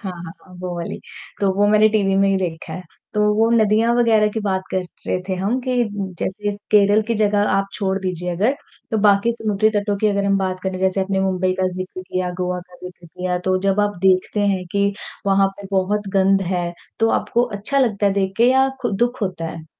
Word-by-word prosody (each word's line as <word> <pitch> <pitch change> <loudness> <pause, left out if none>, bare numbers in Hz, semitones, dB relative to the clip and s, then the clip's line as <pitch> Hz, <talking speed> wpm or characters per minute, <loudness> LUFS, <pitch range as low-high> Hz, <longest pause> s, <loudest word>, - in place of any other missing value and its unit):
हाँ, 190 -4 -5
हाँ, 170 -1 -9
हाँ। 185 - -15
वो 180 -1 -4
वाली, 170 - -5 0.4
तो 195 - +2
वो 205 +1 +3
मैंने 215 +1 +5
टीवी 200 -3 +1
में 195 0 +3
ही 195 - +2
देखा 165 -3 -4
है, 185 - -6 0.3
तो 210 - +1
वो 225 +1 +3
नदियाँ 225 +1 +3
वग़ैरह 220 -3 +4
की 220 - -3
बात 190 -2 -1
कर 185 - 0 0.2
रहे - - 0
थे 185 - 0
हम 200 +7 -1
कि, 250 0 -2 0.4
जैसे 205 +2 -2 0.2
केरल 205 +1 +5
की 230 +2 -2
जगह 205 -1 +2
आप 195 0 +1
छोड़ 195 -2 -1
दीजिए 180 -2 -3
अगर, 230 +10 +1 0.3
तो 220 - 0
बाकी 205 +3 +4
समुद्री 215 -1 +1
तटों 205 0 -1
की 215 - +1
अगर 200 -1 0
हम 200 0 +2
बात 185 -1 -2
करें, 190 -1 -2
जैसे 190 +1 +1
अपने 190 0 0
मुंबई 185 -1 +1
का 185 - +2
ज़िक्र 185 0 -6
लिया, 185 0 -3
गोवा 180 0 -1
का 180 0 -17
ज़िक्र 175 -1 -10
लिया, 180 +2 -3
तो 185 0 +2
जब 195 +1 +1
आप 205 -2 0
देखते 190 +2 +2
हैं 190 -2 0
कि 200 0 +1 0.3
वहाँ 195 0 +4
पे 200 - -8
बहुत 200 +2 0
गंध 195 0 +4
है, 175 -1 -1 0.3
तो 225 - +3
आपको 240 - 0 0.2
अच्छा 275 +8 0
लगता 215 -6 +2
है 195 - +3
देख 195 -1 0
के 235 - +4
या 265 +1 +4
खु 240 - 0
दुःख 240 +5 -1
होता 180 -4 -3
है? 160 -1 -8
195 Hz, 225 wpm, -20 LUFS, 185-210 Hz, 0.4 s, मैंने